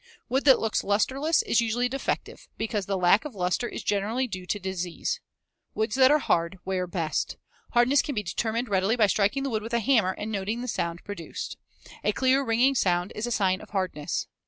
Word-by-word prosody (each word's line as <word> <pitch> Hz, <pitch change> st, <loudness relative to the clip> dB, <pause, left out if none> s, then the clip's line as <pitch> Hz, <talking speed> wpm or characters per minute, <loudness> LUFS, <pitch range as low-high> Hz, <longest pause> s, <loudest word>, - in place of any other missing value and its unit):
Wood 265 Hz, +3 st, 0 dB
that 265 Hz, -3 st, +7 dB
looks 225 Hz, -1 st, 0 dB
lusterless 265 Hz, +10 st, +2 dB
is 235 Hz, -, +2 dB
usually 235 Hz, +2 st, +1 dB
defective, 270 Hz, +2 st, -4 dB
because 215 Hz, -3 st, -2 dB
the 195 Hz, -1 st, 0 dB
lack 180 Hz, +5 st, +4 dB
of 295 Hz, -7 st, -7 dB
luster 180 Hz, +5 st, 0 dB
is -, -, -6 dB
generally 210 Hz, +6 st, 0 dB
due 185 Hz, -5 st, -7 dB
to 205 Hz, -, 0 dB
disease. 185 Hz, -3 st, -3 dB, 0.6 s
Woods 220 Hz, 0 st, -1 dB
that 260 Hz, -1 st, +6 dB
are 300 Hz, -, +6 dB
hard 170 Hz, -, 0 dB
wear 185 Hz, -1 st, -1 dB
best. 165 Hz, -4 st, -2 dB, 0.4 s
Hardness 255 Hz, +4 st, +5 dB
can 290 Hz, -, -4 dB
be 210 Hz, -, -1 dB
determined 225 Hz, +6 st, -2 dB
readily 195 Hz, +2 st, +2 dB
by 225 Hz, -3 st, +4 dB
striking 205 Hz, +7 st, +1 dB
the 275 Hz, -, -2 dB
wood 215 Hz, -1 st, -1 dB
with 230 Hz, +2 st, -3 dB
a -, -, +3 dB
hammer 220 Hz, -5 st, +3 dB
and 215 Hz, +1 st, -5 dB
noting 210 Hz, +3 st, -2 dB
the 250 Hz, -, -5 dB
sound 170 Hz, -6 st, -3 dB
produced. 205 Hz, -5 st, -6 dB, 0.5 s
A -, -, +2 dB
clear, 265 Hz, +1 st, +3 dB
ringing 245 Hz, +3 st, +3 dB
sound 180 Hz, -6 st, +1 dB
is 220 Hz, +3 st, -3 dB
a -, -, -3 dB
sign 190 Hz, -4 st, +1 dB
of 215 Hz, -, -12 dB
hardness. 185 Hz, -7 st, -2 dB
215 Hz, 205 wpm, -27 LUFS, 190-245 Hz, 0.6 s, that